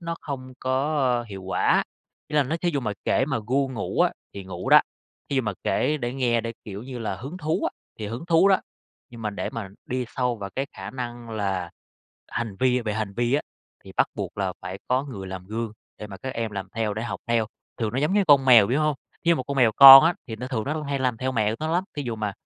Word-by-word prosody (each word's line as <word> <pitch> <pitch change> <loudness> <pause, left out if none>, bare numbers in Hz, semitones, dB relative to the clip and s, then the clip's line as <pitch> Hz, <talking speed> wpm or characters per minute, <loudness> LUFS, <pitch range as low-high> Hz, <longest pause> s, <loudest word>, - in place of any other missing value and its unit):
nó 170 -1 -3
không 130 -3 -6
có, 135 +4 0 0.2
ơ, - - -7
hiệu 95 -2 -8
quả. 95 - +2 0.5
Ý 150 - -2
là 145 - +5
nó 155 +5 -2
thí 175 +1 0
dụ 140 -3 -1
mà 105 -4 -2
kể 130 - +2
mà 135 -5 -1
ru 135 +1 +2
ngủ 110 - -2
á, - - +4 0.2
thì 100 -1 -7
ngủ 90 -1 -5
đó. - - +9 0.5
Thí 140 - 0
dụ 130 - +3
mà 105 -2 -2
kể 150 - +1
để 120 -3 -3
nghe, 120 -3 +1
để, 115 +1 -5
kiểu 100 +1 -7
như 125 -1 -7
là, 110 -4 -3
hứng 135 - -7
thú 155 0 -1
á, - - +1 0.3
thì 105 - -4
hứng 120 +10 -6
thú 170 +3 +5
đó, 190 - +4 0.5
nhưng 115 -1 -10
mà 105 - -1
để 100 - -4
mà 110 -4 -5 0.2
đi 125 0 -2
sâu 125 -2 -1
vào 100 -1 -6
cái 135 +1 -1
khả 95 +2 -8
năng 120 -2 -6
là 95 -5 -2 0.6
hành 110 -5 -4
vi 125 -1 +3
về 105 -2 -2
hành 110 -2 -3
vi 120 +2 +1
á, 150 - +1 0.4
thì - - -11
bắt - - +4
buộc - - -5
là 95 -2 0
phải 95 +2 -6
có 130 +2 +1
người 100 -9 -7
làm 95 -1 -7
gương 110 +1 -4 0.3
để 105 - -7
mà 100 -2 -9
các 130 +6 -6
em 115 -1 -2
làm 100 -2 -5
theo, 110 -2 -1
để 110 - -3
học 120 - -4
theo. 115 -2 +1 0.3
Thường 110 -1 -1
nó 130 - -1
giống 150 +6 +1
như 205 -1 +3
con 140 -3 +6
mèo, 120 -6 +7
biểu 135 +5 +1
hông? 150 -1 +2 0.3
Thí - - 0
dụ 170 - +5
một 130 - -2
con 140 +2 -5
mèo 120 -4 +4
con 135 +2 +12
á, 170 +1 +3
thì 110 -2 -6
nó 125 +3 -6
thường 115 -5 -2
nó 150 - -2
cũng 155 -1 -4
hay 140 -1 -2
làm 125 -3 0
theo 130 +2 -2
mẹ 110 -2 +1
nó 155 - -2
lắm, 180 +2 +1
thí 145 - -2
dụ 120 -3 -4
mà 105 -2 -2
120 Hz, 270 wpm, -25 LUFS, 105-140 Hz, 0.6 s, con